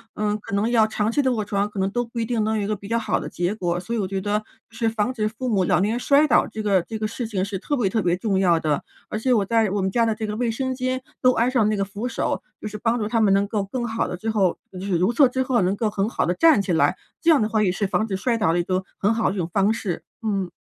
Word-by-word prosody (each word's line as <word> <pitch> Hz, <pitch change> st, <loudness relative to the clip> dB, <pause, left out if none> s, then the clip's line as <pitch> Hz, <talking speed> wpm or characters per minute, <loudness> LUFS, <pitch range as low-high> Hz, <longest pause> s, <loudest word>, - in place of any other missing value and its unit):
嗯， 210 Hz, 0 st, 0 dB
可 200 Hz, -, -5 dB
能 210 Hz, +3 st, +1 dB
要 225 Hz, -2 st, +4 dB
长 215 Hz, 0 st, -1 dB
期 290 Hz, -, +2 dB
地 265 Hz, -, +1 dB
卧 215 Hz, -3 st, -1 dB
床， 200 Hz, 0 st, -1 dB
可 205 Hz, -2 st, -6 dB
能 190 Hz, -, +1 dB
都 240 Hz, +1 st, -1 dB
不 235 Hz, +1 st, -6 dB
一 225 Hz, -, 0 dB
定 225 Hz, -1 st, -1 dB
能 220 Hz, 0 st, 0 dB
有 210 Hz, -, -1 dB
一 200 Hz, -, -2 dB
个 215 Hz, -, 0 dB
比 200 Hz, 0 st, -11 dB
较 230 Hz, +1 st, 0 dB
好 230 Hz, -, 0 dB
的 -, -, -6 dB
结 175 Hz, +3 st, -2 dB
果。 175 Hz, -5 st, -2 dB
所 200 Hz, +6 st, -6 dB
以 225 Hz, -, -1 dB
我 190 Hz, -, -1 dB
觉 190 Hz, 0 st, -3 dB
得 210 Hz, +1 st, 0 dB, 0.3 s
是 225 Hz, 0 st, -2 dB
防 225 Hz, +2 st, -1 dB
止 215 Hz, -4 st, -1 dB
父 235 Hz, +4 st, -4 dB
母 195 Hz, -4 st, +2 dB
老 -, -, +3 dB
年 205 Hz, +2 st, +1 dB
人 240 Hz, -, -1 dB
摔 285 Hz, +3 st, +4 dB
倒 255 Hz, -, +4 dB
这 215 Hz, 0 st, -6 dB
个 200 Hz, -3 st, +3 dB
这 220 Hz, +3 st, -6 dB
个 215 Hz, -, -2 dB
事 235 Hz, +1 st, -5 dB
情 200 Hz, -4 st, -1 dB
是 195 Hz, -1 st, -3 dB
特 290 Hz, -, -2 dB
别 230 Hz, -8 st, +1 dB
特 220 Hz, +3 st, 0 dB
别 175 Hz, -2 st, +1 dB
重 195 Hz, 0 st, 0 dB
要 175 Hz, -3 st, +4 dB
的， 155 Hz, -2 st, -1 dB, 0.3 s
而 215 Hz, -, -3 dB
且 255 Hz, +2 st, +2 dB
我 215 Hz, -, +3 dB
在 225 Hz, -1 st, +2 dB
我 200 Hz, +1 st, -1 dB
们 190 Hz, 0 st, 0 dB
家 230 Hz, +3 st, +2 dB
的 225 Hz, -1 st, 0 dB
这 220 Hz, 0 st, -4 dB
个 210 Hz, 0 st, -4 dB
卫 240 Hz, -1 st, 0 dB
生 260 Hz, +3 st, -2 dB
间 255 Hz, 0 st, -2 dB, 0.2 s
都 255 Hz, -1 st, +5 dB
安 235 Hz, +3 st, +1 dB
上 235 Hz, -5 st, +3 dB
那 215 Hz, -, +1 dB
个 195 Hz, -, 0 dB
扶 205 Hz, +5 st, -5 dB
手， 230 Hz, -, -2 dB, 0.2 s
就 -, -, -4 dB
是 210 Hz, -, -6 dB
帮 230 Hz, +2 st, 0 dB
助 215 Hz, -, -2 dB
他 230 Hz, -1 st, +1 dB
们 200 Hz, -3 st, +4 dB
能 200 Hz, +1 st, +3 dB
够 205 Hz, -3 st, -1 dB
更 240 Hz, +4 st, -3 dB
好 225 Hz, 0 st, -1 dB
的 -, -, -4 dB
最 220 Hz, +5 st, -4 dB
后 195 Hz, -5 st, +1 dB
就 185 Hz, -, -8 dB
是 190 Hz, -3 st, 0 dB
如 185 Hz, +7 st, +2 dB
厕 270 Hz, +3 st, +5 dB
之 260 Hz, +1 st, -1 dB
后 250 Hz, -4 st, +1 dB
能 185 Hz, +2 st, +1 dB
够 215 Hz, +1 st, 0 dB
很 200 Hz, 0 st, -1 dB
好 -, -, 0 dB
地 175 Hz, -, +1 dB
站 315 Hz, -, +5 dB
起 190 Hz, -, -3 dB
来， 165 Hz, -, +3 dB, 0.3 s
这 335 Hz, -, +2 dB
样 310 Hz, -6 st, +6 dB
的 215 Hz, -, +1 dB
话 215 Hz, -1 st, +1 dB
也 185 Hz, -3 st, +2 dB
是 200 Hz, +2 st, -1 dB
防 205 Hz, +3 st, 0 dB
止 195 Hz, -, -2 dB
摔 230 Hz, +5 st, 0 dB
倒 165 Hz, -7 st, +2 dB
的 175 Hz, -, +1 dB
一 -, -, +1 dB
个 185 Hz, +1 st, -1 dB
很 205 Hz, +3 st, +2 dB
好 225 Hz, 0 st, +1 dB
的 190 Hz, -, -3 dB
一 -, -, -5 dB
种 170 Hz, -1 st, -2 dB
方 205 Hz, +2 st, +3 dB
式， 190 Hz, -7 st, -4 dB, 0.2 s
嗯。 195 Hz, -4 st, -1 dB
215 Hz, 355 characters per minute, -23 LUFS, 195-230 Hz, 0.3 s, 样